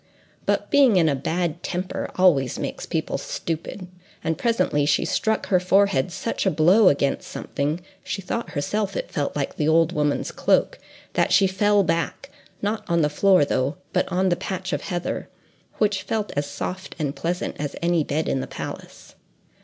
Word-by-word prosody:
But - - 0
being 270 -7 +6
in 170 -3 +4
a 150 - +3
bad 170 +4 -2
temper 180 +1 -3
always 145 -9 +3
makes - - -5
people - - -2
stupid, 170 +3 -5 0.4
and 160 0 0
presently 230 -11 +1
she 145 - +2
struck 220 -1 0
her 185 -3 +4
forehead 185 -5 +2
such 205 +2 -2
a - - +6
blow 185 +5 +5
against 140 -1 0
something—she 175 +7 -4
thought 230 +6 -3
herself 200 +7 -1
it - - -4
felt 145 -4 -2
like 140 -2 -3
the 150 - +1
old 165 +1 +4
woman's 150 -3 0
cloak—that - - 0
she 200 0 +6
fell 205 +2 +3
back—not 205 +4 -3
on 170 -1 +3
the 150 - +2
floor, 185 +1 +4
though, 135 +4 -1 0.2
but - - 0
on 185 +1 +2
the 175 - +2
patch 185 +1 -4
of - - -1
heather, 175 -3 -3 0.5
which 205 -2 +1
felt 215 -2 -2
as 145 0 -1
soft 185 +5 -5
and 145 -3 -2
pleasant 175 +2 -2
as 145 -1 -3
any 170 -2 +2
bed 150 +2 -1
in 135 - 0
the - - -4
palace. - - -8
175 Hz, 170 wpm, -24 LUFS, 150-195 Hz, 0.5 s, being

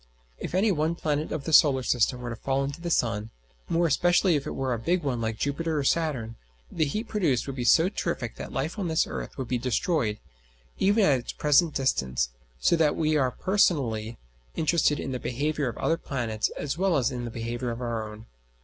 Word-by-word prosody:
If - - -4
any 205 +3 +3
one 160 -1 0
planet 150 -2 -2
of 155 -3 -3
the 160 - -3
system 130 -4 +4
were 120 -1 -4
to - - -4
fall 135 +4 -1
into 140 +4 -5
the 170 - -3
sun, 115 -8 0 0.4
more 170 +1 +2
especially 175 +3 +3
if 140 - -2
it - - -4
were 130 -1 -1
a 115 - -2
big 175 +9 0
one 125 -5 -1
like 110 -1 -2
Jupiter 155 +4 -1
or 145 - 0
Saturn, 135 -7 0 0.3
the 160 - +1
heat 215 +10 -3
produced 165 - +1
would 135 - -5
be 125 - -3
so 160 +8 +5
terrific 170 - -3
that - - -7
life 155 +10 -3
on 190 - -1
this 160 -1 +2
earth - - -6
would 130 -3 -4
be 125 0 -1
destroyed, 125 -2 0 0.6
even 205 +1 +4
at 135 -3 +4
its 120 - -7
present 150 +2 +3
distance; 65 - 0 0.3
so 170 - +3
that 155 -2 +3
we 155 -1 +1
are 135 -4 +3
personally 125 - +1 0.4
interested 155 -2 +2
in 135 - -4
the 125 - -3
behaviour 145 +2 -1
of - - -7
the - - -9
other 165 - +2
planets 120 -8 -2
as 145 +3 -3
well 190 -4 +2
as 130 -1 +1
in 125 -1 -4
the - - -4
behaviour 115 +2 -4
of 115 0 -4
our 115 -3 -3
own. 105 +1 -11
140 Hz, 215 wpm, -27 LUFS, 120-165 Hz, 0.6 s, so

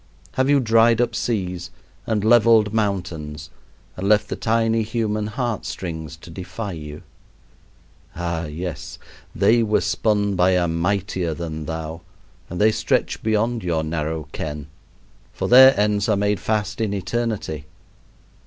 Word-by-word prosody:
Have 130 +1 0
you 145 -1 +5
dried 115 -1 +4
up 120 -1 +1
seas 95 -7 -2 0.4
and 110 -3 0
leveled 110 -2 +5
mountains 85 -8 -3 0.4
and 95 +2 -2
left 105 0 +3
the - - -2
tiny 115 0 +1
human 110 -1 -1
heart 115 -1 -3
strings 80 -4 -6
to 85 - -13
defy 95 +4 -6
you? 75 -3 -8 1.1
Ah, 85 -1 -2
yes! 85 +3 -6 0.4
they 120 +1 +4
were 110 -1 +2
spun 105 -2 0
by 90 +1 +3
a 90 -1 +2
Mightier 85 0 -1
than 80 -2 -5
thou, 80 0 -5 0.5
and 85 - -5
they 110 +1 +5
stretch - - 0
beyond 110 +1 0
your 85 -3 0
narrow 80 -1 -3
ken, 75 -2 -5 0.7
for - - -3
their 130 0 +8
ends 105 0 +1
are 105 - +3
made 100 +1 +1
fast 105 0 -2
in 105 -2 0
eternity. 100 - -3
100 Hz, 140 wpm, -22 LUFS, 85-110 Hz, 1.1 s, their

